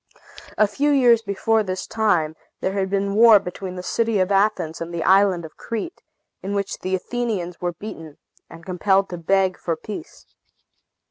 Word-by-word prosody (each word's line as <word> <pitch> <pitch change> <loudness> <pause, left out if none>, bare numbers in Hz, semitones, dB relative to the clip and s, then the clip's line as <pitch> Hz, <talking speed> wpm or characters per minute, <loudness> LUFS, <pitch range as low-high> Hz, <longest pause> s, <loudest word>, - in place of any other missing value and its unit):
A 215 - +5
few 275 +9 0
years 245 -5 +5
before 220 +1 +1
this 185 -2 -4
time, 175 -8 +1 0.2
there 190 - -2
had 195 -1 -1
been 200 0 0
a - - -2
war 225 0 +8
between 180 0 -7
the 180 - -6
city 225 +2 0
of 185 +1 +1
Athens 195 -6 +1
and 165 +1 -5
the 170 -1 -3
island 190 -3 +4
of 155 - -13
Crete, 230 - -5 0.4
in 200 +2 -4
which 200 -1 -3
the 185 0 -1
Athenians 195 -4 -3
were 175 -1 -1
beaten, 165 -5 -9 0.3
and 165 0 -13
compelled 190 +1 +1
to 175 - -5
beg 190 +2 +1
for 165 - -2
peace. 215 - -9
195 Hz, 180 wpm, -22 LUFS, 180-215 Hz, 0.4 s, war